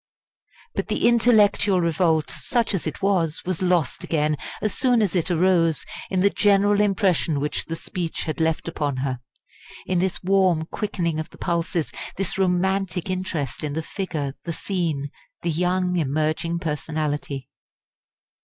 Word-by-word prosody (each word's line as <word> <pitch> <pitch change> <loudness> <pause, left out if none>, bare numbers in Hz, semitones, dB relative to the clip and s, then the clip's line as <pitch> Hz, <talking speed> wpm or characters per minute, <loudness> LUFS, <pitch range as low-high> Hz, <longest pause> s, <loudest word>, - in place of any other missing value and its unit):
But - - -2
the - - +2
intellectual 215 -5 +4
revolt, 165 -2 +2
such 235 -3 0
as 185 -4 -1
it 155 +4 -5
was, 175 -6 +1
was 185 -1 -2
lost 175 -8 +1
again, 150 -1 +1 0.2
as 215 - -1
soon 250 -2 +3
as 205 -5 +1
it 175 0 +1
arose, 170 -2 +2 0.2
in 185 -1 +1
the 200 +1 +4
general 205 0 +4
impression 190 -7 +2
which 150 +1 -2
the 165 - -4
speech 170 0 -4
had 155 - -4
left 160 0 0
upon 145 -5 -2
her 130 -2 -2 0.7
in 185 -1 +1
this 190 +1 -1
warm 185 -4 +3
quickening 170 -4 -2
of 155 - -4
the - - -16
pulses, 170 -1 -1 0.3
this 195 0 -2
romantic 190 -1 +1
interest 170 -9 -3
in 150 -1 -2
the 160 +2 -2
figure, 155 -8 -3
the 170 - -3
scene, 160 -7 -2 0.3
the 170 - +1
young 180 +2 +1
emerging 155 +3 0
personality. 150 -3 -3
175 Hz, 150 wpm, -24 LUFS, 155-190 Hz, 0.7 s, intellectual